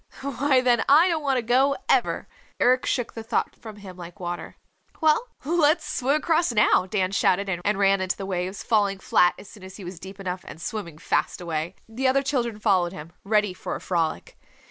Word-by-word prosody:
"Why, 275 -1 +2
then 245 -2 +3
I 310 +6 +7
don't 325 -2 0
want 275 -3 +1
to 245 - -1
go, 265 +4 +3
ever." - - +1 0.3
Eric 255 +1 +3
shook 245 -3 -1
the 225 - -6
thought 225 +1 -1
from 220 -2 -10
him 195 -3 -11
like 175 +3 -10
water. 175 -1 -5 0.4
"Well, 315 +10 +3 0.2
let's 315 0 +2
swim 270 +3 0
across 325 0 +1
now," 210 -4 +3
Dan 190 -2 0
shouted, 200 0 +2 0.2
and 205 -1 +1
ran 195 -1 +3
into 190 0 -1
the 195 - -5
waves, 185 0 -3
falling 205 -3 +1
flat 180 -1 +3
as - - -12
soon 205 - -14
as 190 0 -10
he 200 - -9
was 175 -1 -8
deep 190 +2 -10
enough 185 -1 -4
and - - -9
swimming 170 -4 -5
fast - - -1
away. 170 0 -3
The 245 +4 -1
other 275 +1 +3
children 240 -6 -1
followed 190 -5 +1
him, 155 -1 -9
ready 210 -2 +1
for 185 - -5
a - - -5
frolic. 165 -3 -2
210 Hz, 205 wpm, -25 LUFS, 185-255 Hz, 0.4 s, I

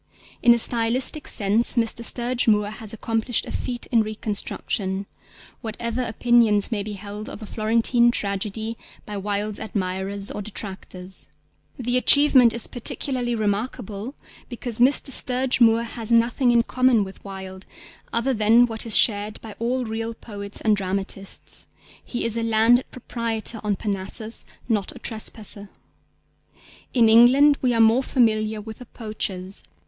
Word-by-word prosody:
In 240 - +6
a - - 0
stylistic 240 +6 +1
sense 215 +5 +2
Mr. 235 0 0
Sturge 240 +1 +1
Moore 210 -1 +2
has 215 -1 -7
accomplished 225 +1 -1
a - - -8
feat 245 -1 -4
in 230 -2 +4
reconstruction, 205 -2 -3 0.6
whatever 235 +2 -4
opinions 230 -2 +2
may 215 -3 -1
be 210 +1 -6
held 205 +2 -8
of 220 - -9
A - - -6
Florentine 230 +3 +2
Tragedy 215 +1 -3 0.3
by 210 - -6
Wilde's 205 +1 -2
admirers 195 -1 -2
or - - -5
detractors. 190 -2 -8 0.5
The 245 0 0
achievement 260 -2 +6
is 235 -1 -1
particularly 245 0 -1
remarkable 215 +2 -3 0.3
because 240 -2 -3
Mr. 270 +2 +4
Sturge 255 0 +2
Moore 230 0 +5
has 230 -1 -6
nothing 235 +2 +3
in 235 -1 +4
common 255 -3 +2
with 190 0 -11
Wilde 190 -1 -9 0.4
other 235 +3 0
than 225 +2 +5
what 225 -1 -3
is 220 - +4
shared 210 -1 +2
by 220 -2 -9
all 245 +2 -1
real 225 +1 -4
poets 205 -3 -6
and 215 -1 +3
dramatists: 195 0 -5 0.4
He 240 - -4
is 230 -1 0
a - - 0
landed 230 +2 +3
proprietor 230 -2 -3
on 210 -1 0
Parnassus, 205 +3 -2 0.2
not 210 -5 -1
a - - -9
trespasser. 215 -2 -3 1.2
In 235 -3 +4
England 255 +6 +6
we 255 - +2
are - - 0
more 225 +3 +5
familiar 220 -4 +1
with 220 +1 -10
the 250 - -11
poachers. 200 -4 -5
225 Hz, 145 wpm, -23 LUFS, 205-240 Hz, 1.2 s, In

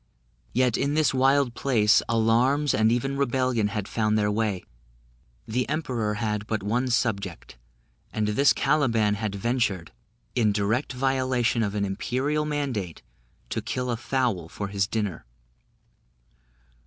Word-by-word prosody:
Yet 125 -2 +2
in 140 +1 0
this 155 -3 +3
wild 135 -1 +3
place, 110 -5 +3
alarms 120 +6 +2
and 110 +1 +3
even 135 +3 0
rebellion 130 -4 +1
had 105 -1 -4
found 110 -1 +1
their 105 -1 +1
way, 105 -3 -1 0.8
the 125 +4 -1
Emperor 125 -9 -1
had 105 -1 -2
but 110 -3 -2
one 120 +5 0
subject, 100 - -2 0.5
and 105 -1 -1
this 135 +7 +4
Caliban 120 -8 +2
had 105 -1 -3
ventured, 105 -5 -1 0.4
in 110 -4 +2
direct 105 +6 0
violation 130 -2 +1
of 105 -2 -1
an 100 -1 0
imperial 135 +10 -1
mandate, 130 - -3 0.5
to - - -1
kill 125 -1 -3
a - - 0
fowl 120 -8 -1
for 100 +2 -5
his 100 -1 0
dinner. 105 -6 -3
115 Hz, 135 wpm, -26 LUFS, 105-130 Hz, 0.8 s, this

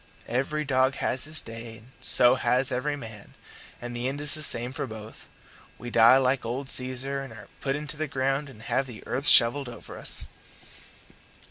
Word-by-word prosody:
Every 140 +5 -2
dog 130 0 +1
has 130 -1 -2
his 155 0 -4
day 115 0 -10
and 115 +4 -20
so 120 0 +7
has 130 0 0
every 140 +4 -2
man; 110 -6 -12 0.4
and 120 0 -8
the 120 +1 -3
end 140 +2 -4
is 145 -1 -2
the 155 - -1
same 120 -4 +1
for 140 -1 -5
both. 110 -1 -11 0.5
We 120 0 -9
die 115 +3 +6
like 130 0 0
old 130 +4 -5
Caesar, 130 +2 -1
and 135 -3 -10
are 110 - -13
put 135 -1 -2
into 150 0 -5
the 155 0 -3
ground 135 +1 -2
and 110 -5 -15
have 135 - -2
the 120 -4 -11
earth 135 +3 -4
shovelled 125 +2 +6
over 120 - -11
us." - - +3
130 Hz, 190 wpm, -25 LUFS, 120-140 Hz, 0.5 s, so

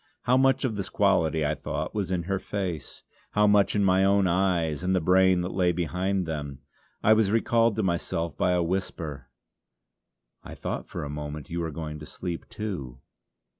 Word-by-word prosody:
How 125 - +3
much 135 0 +3
of 110 -5 -2
this 100 - -3
quality 80 -6 +2
I 75 - +1
thought, 70 - -4
was 100 -4 -2
in 90 -2 -1
her 95 +2 -1
face, 95 -7 -5 0.3
how 105 0 +4
much 105 0 +4
in 105 - +2
my 95 0 +4
own 100 0 +4
eyes 85 -4 +1
and 95 +1 +1
the - - +3
brain 95 +1 +4
that 90 - -4
lay 90 -2 +2
behind 90 +3 -1
them. 75 -4 -4 0.5
I 110 - +6
was 110 -2 +3
recalled 115 0 +2
to 110 - 0
myself 85 -3 -1
by 90 +4 +1
a 90 -1 +2
whisper: 85 -6 -3 1.2
"I - - -9
thought - - -4
for - - -5
a 70 - -5
moment 75 0 -6
you 85 - -2
were 85 -1 -2
going 75 0 -6
to 75 - -9
sleep 85 -2 -6
too. 75 - -5
90 Hz, 190 wpm, -27 LUFS, 80-100 Hz, 1.2 s, I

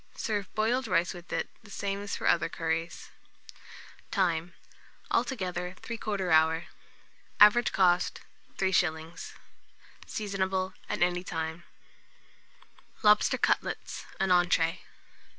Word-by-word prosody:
Serve 205 -3 -3
boiled 240 +5 +1
rice 175 0 +1
with 175 -1 -12
it, - - -1
the 220 - -17
same 200 0 -3
as 205 - -4
for - - -6
other 165 - +3
curries. 165 +1 -3 1.0
Time. 175 -3 0 0.6
Altogether, 180 -7 -1
3/4 205 -5 -3
hour. 160 +1 +4 0.7
Average 210 +3 +7
cost, 180 -2 +2 0.4
3s. 170 -4 -1 0.7
Seasonable 190 -2 -2 0.2
at - - +1
any 175 0 0
time. 160 -1 -4 1.4
LOBSTER 210 0 +5
CUTLETS - - -1
(an 195 -2 +1
Entree). 175 -1 +3
180 Hz, 100 wpm, -29 LUFS, 170-200 Hz, 1.4 s, Average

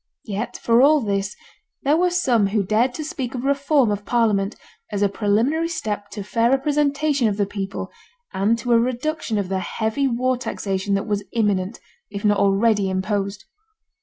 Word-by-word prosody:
Yet 215 +3 -4
for 230 +1 +3
all 300 +3 +6
this, 200 -2 -2 0.5
there 285 +2 +3
were 360 +2 +3
some 255 - +2
who 205 +1 0
dared 235 +6 +1
to 310 - -4
speak 265 -4 -4
of 245 - -4
reform 280 -3 +2
of 205 0 -3
Parliament, 215 -4 +1 0.4
as 205 -1 0
a 200 - +3
preliminary 230 +11 +1
step 210 -11 -4
to 205 0 -6
fair 230 +3 +1
representation 285 0 +1
of 205 -2 -1
the 205 - +2
people, 195 -1 -5 0.4
and 205 +4 +2
to 240 +2 0
a 230 - +6
reduction 250 0 -1
of 200 -2 -1
the 190 0 -1
heavy 220 +8 -1
war 255 +1 0
taxation 200 -5 -2
that 195 - -1
was 205 -1 -1
imminent, 205 -2 0 0.3
if 200 0 -6
not 205 -1 +3
already 200 0 +3
imposed. 195 +1 -2
220 Hz, 175 wpm, -22 LUFS, 200-260 Hz, 0.5 s, all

